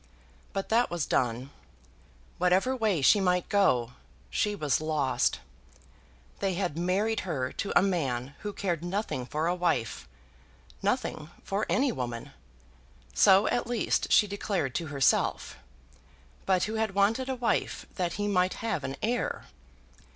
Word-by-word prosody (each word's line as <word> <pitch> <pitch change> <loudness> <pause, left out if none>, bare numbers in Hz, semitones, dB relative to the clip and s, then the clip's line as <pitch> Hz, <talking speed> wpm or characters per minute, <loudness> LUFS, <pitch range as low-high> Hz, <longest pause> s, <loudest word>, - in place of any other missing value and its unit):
But 195 -1 -4
that 235 +2 +3
was 170 -3 -2
done. 125 +2 -1 0.9
Whatever 185 +9 +2
way 210 - 0
she 205 - +6
might 180 -2 +1
go, 125 - +2 0.4
she 210 - 0
was 150 -6 0
lost. 150 -5 0 1.0
They 195 -2 0
had 180 -5 -2
married 195 +6 0
her 135 -8 -2
to 200 - -4
a 180 - +5
man 140 -9 -1
who 205 - -4
cared 175 -5 -2
nothing 175 - -3
for 155 +3 -2
a 175 - +2
wife, 115 - -1 0.7
nothing 150 0 -1
for 200 +2 -2
any 265 0 +2
woman, 120 - -5 0.8
so 190 - +6
at 240 - 0
least 240 -3 0
she - - +6
declared 195 -8 -2
to 170 - -2
herself, 140 -2 +1 0.9
but 185 -2 +3
who 215 - -2
had 215 -3 -1
wanted 225 +6 +2
a 265 - -1
wife 240 -2 -1
that 175 -3 -2
he 205 0 -2
might 185 -2 +1
have 230 - -1
an 135 - -4
heir. 240 +2 -1
180 Hz, 145 wpm, -28 LUFS, 145-205 Hz, 1.0 s, she